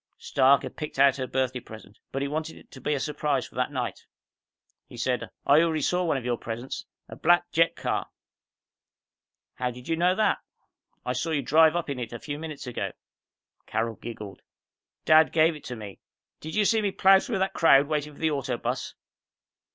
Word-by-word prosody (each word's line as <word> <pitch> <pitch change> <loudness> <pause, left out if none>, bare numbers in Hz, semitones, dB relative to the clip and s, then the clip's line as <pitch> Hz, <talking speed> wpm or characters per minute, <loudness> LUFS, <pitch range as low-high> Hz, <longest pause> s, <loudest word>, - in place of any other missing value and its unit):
Stark 135 0 +3
had - - -8
picked 150 - -6
out 135 0 +5
her 130 -1 -3
birthday 130 -1 -1
present, 110 -3 -13
but 135 +1 -2
he - - -1
wanted 155 +2 -4
it - - -18
to 130 - -12
be 150 +4 0
a - - -2
surprise 145 -1 -1
for - - -22
that 125 +3 -1
night. 125 -3 -4 0.8
He 120 - -12
said, 125 +1 -1 0.2
"I 145 +3 +6
already 160 -3 +1
saw 180 +4 +1
one 160 -4 +1
of 125 - -6
your 120 -1 0
presents. 120 +3 -6 0.2
A - - -9
black 175 +1 +3
jet 165 +1 +3
car!" - - -2 1.5
"How 125 -1 -2
did 125 0 -10
you 165 - +1
know 180 +2 +2
that?" 215 - +2 0.7
"I 125 - -1
saw 130 +7 -2
you 145 -4 0
drive 160 +4 +5
up 175 - -1
in 140 -3 -4
it 120 -1 -5
a - - -4
few 145 -1 -6
minutes 155 -3 -7
ago." 125 -2 -4 0.7
Carol 115 0 -1
giggled. 105 -3 -9 0.6
"Dad 155 0 +6
gave 160 0 +3
it 150 - -12
to 125 - -5
me. 105 -3 -9 0.4
Did 155 +1 -7
you 210 -1 +3
see 225 +1 +3
me 205 - +1
plow 190 0 +5
through 225 0 -3
that 190 0 0
crowd 145 -4 +5
waiting 150 -1 -2
for - - -17
the 160 -1 +1
auto 135 -4 -2
bus?" - - -4
145 Hz, 205 wpm, -26 LUFS, 125-160 Hz, 1.5 s, I